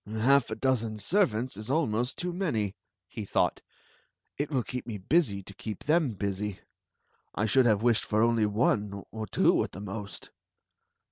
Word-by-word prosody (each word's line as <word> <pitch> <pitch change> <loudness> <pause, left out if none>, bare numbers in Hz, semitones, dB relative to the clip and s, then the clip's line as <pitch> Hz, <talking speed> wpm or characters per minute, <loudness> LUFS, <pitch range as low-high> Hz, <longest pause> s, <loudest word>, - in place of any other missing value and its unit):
Half 115 +5 +3
a - - -3
dozen 115 -5 0
servants 130 - +1
is 105 +3 -6
almost 125 -5 0
too 180 0 -2
many/' 115 - -1 0.3
he 110 - -6
thought 100 - 0 0.7
It 145 +1 -2
will 130 -5 0
keep 125 +1 -6
me 110 -3 -4
busy 100 - +1
to 100 - -11
keep 105 +1 -7
them 155 -5 +2
busy. 100 0 -3 0.8
I 105 - +1
should 120 +4 +4
have 110 -1 +2
wished 120 -2 +3
for 105 +1 +2
only 115 -2 +3
one 105 -2 0
— - - -49
or 110 -1 -5
two - - +3
at - - -7
the 95 - -7
most." 100 0 -7
110 Hz, 175 wpm, -29 LUFS, 105-130 Hz, 0.8 s, should